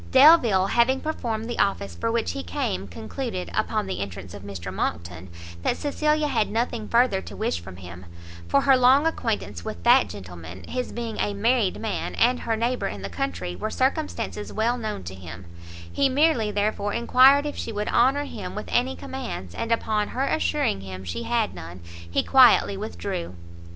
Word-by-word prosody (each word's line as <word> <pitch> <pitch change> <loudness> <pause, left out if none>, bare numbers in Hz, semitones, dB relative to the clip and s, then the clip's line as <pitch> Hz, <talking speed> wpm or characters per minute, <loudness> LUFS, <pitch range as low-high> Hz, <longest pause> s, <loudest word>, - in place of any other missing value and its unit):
Delvile, 260 - +6
having 240 +6 +2
performed 230 -8 -3
the 240 - -5
office 100 - 0
for 85 +7 -2
which 85 - 0
he 90 +1 -4
came, 90 +2 -3
concluded, 180 - -5
upon 215 -2 0
the 190 - -4
entrance 95 -2 -6
of 100 - -9
Mr 95 -2 -7
Monckton, 85 0 -4 0.3
that - - 0
Cecilia 300 +1 0
had 220 -7 +1
nothing 230 0 -2
further 235 -5 +3
to 100 - -10
wish 85 -2 -1
from 90 +2 -10
him; 90 0 -11 0.4
for 140 - +3
her 270 - +5
long 260 +4 +5
acquaintance 225 - -2
with 85 - -6
that - - +5
gentleman, 90 -2 -9
his 250 -1 -4
being 230 -2 -5
a 205 - 0
married 225 -1 +1
man, 220 -2 -3
and 250 +2 +3
her 225 - -1
neighbour 240 +3 -1
in 100 -1 -6
the 100 - -4
country, 90 0 -3
were 215 - -3
circumstances 260 -5 -2
well 230 +3 +1
known 220 - -4
to 90 +2 -7
him; 90 -1 -10 0.5
he 275 - +3
merely, 265 -5 +2
therefore, 205 0 -1
enquired 265 +4 +5
if 295 - -3
she 230 - -4
would 210 -1 -3
honour 270 +4 +3
him - - -7
with - - -5
any 260 +2 +1
commands, 235 - -6
and 230 - -4
upon 215 -2 +1
her 265 +2 -2
assuring 290 - 0
him 95 -1 -8
she 85 -4 -4
had 90 - 0
none, 90 0 -9 0.3
he 85 - +1
quietly 255 -6 +6
withdrew. 195 - -5
210 Hz, 180 wpm, -25 LUFS, -, 0.5 s, Delvile